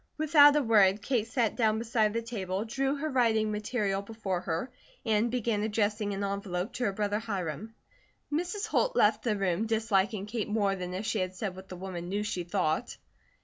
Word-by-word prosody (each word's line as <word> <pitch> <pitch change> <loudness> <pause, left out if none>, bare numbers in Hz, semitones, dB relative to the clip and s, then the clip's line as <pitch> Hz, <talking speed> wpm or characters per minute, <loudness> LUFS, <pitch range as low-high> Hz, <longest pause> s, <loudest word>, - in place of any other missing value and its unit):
Without 295 -2 +6
a 295 - +3
word 205 -3 +4
Kate 230 -2 0
sat 235 -2 0
down 220 -3 +2
beside 225 -1 +1
the 230 +2 -2
table, 200 -3 -3
drew 270 +4 -1
her 300 +2 -3
writing 225 -6 +2
material 210 -2 -1
before 200 -4 -4
her, 175 +9 -3 0.3
and 220 +1 +2
began 230 -3 0
addressing 210 -1 0
an 200 0 -3
envelope 200 +1 -3
to 250 - -2
her 200 - +1
brother 205 +1 -1
Hiram. 200 -1 -4 0.6
Mrs. 355 +6 -1
Holt - - +1
left 210 +1 +4
the 215 -4 0
room, 195 +2 0
disliking 215 -2 +1
Kate 215 0 -3
more 205 -2 +1
than 180 -1 -5
if 195 +4 -4
she 215 - 0
had 185 0 -2
said 190 -1 -4
what 190 0 -11
the 185 - -7
woman 180 -2 -6
knew 205 +2 -1
she 185 -4 -3
thought. 175 -3 -1
210 Hz, 190 wpm, -29 LUFS, 195-230 Hz, 0.6 s, Without